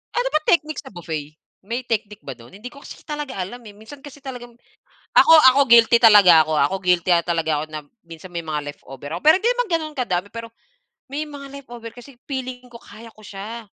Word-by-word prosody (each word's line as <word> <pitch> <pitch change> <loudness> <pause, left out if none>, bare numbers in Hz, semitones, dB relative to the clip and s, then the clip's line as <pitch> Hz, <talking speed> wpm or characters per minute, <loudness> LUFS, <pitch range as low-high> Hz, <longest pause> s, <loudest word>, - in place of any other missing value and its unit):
Ano - - 0
ba 305 - +2
technique 310 -2 +1
sa - - -13
buffet? 155 -4 -7 0.2
May 235 +5 -5
technique 215 -2 -4
ba 135 - -6
do'n 120 +10 -16
hindi 220 +4 -9
ko 280 - -14
kasi - - -13
talaga 295 -4 -6
alam, 195 +7 -6
eh. 215 - -12
Minsan 220 +7 -14
kasi 290 0 -12
talagang 245 -4 -10 0.6
ako, - - +7 0.2
ako 280 - +3
guilty 235 0 +6
talaga 200 -8 +7
ako, 155 - -4
ah, 145 -2 +3
ako 195 - -3
guilty, 180 0 +1
ah, 170 -1 +3
talaga 165 -2 -1
ako 150 - -3
na 155 - -4 0.3
minsan 170 +2 -12
may 170 -1 -6
mga 150 -1 -3
leftover 140 -1 -11
ako - - -7
pero 310 - +7
hindi 450 - +1
naman - - 0
gano'n 315 -3 -2
kadami 200 -7 -2
pero 230 0 -8 0.6
may 300 +2 -4
mga 285 -1 -10
leftover 240 -4 -11
kasi 250 +3 -14
feeling 255 -2 -5
ko 235 - -12
kaya 225 +1 -14
ko 215 - -20
siya. 215 +4 -8
230 Hz, 220 wpm, -21 LUFS, 175-270 Hz, 0.6 s, ako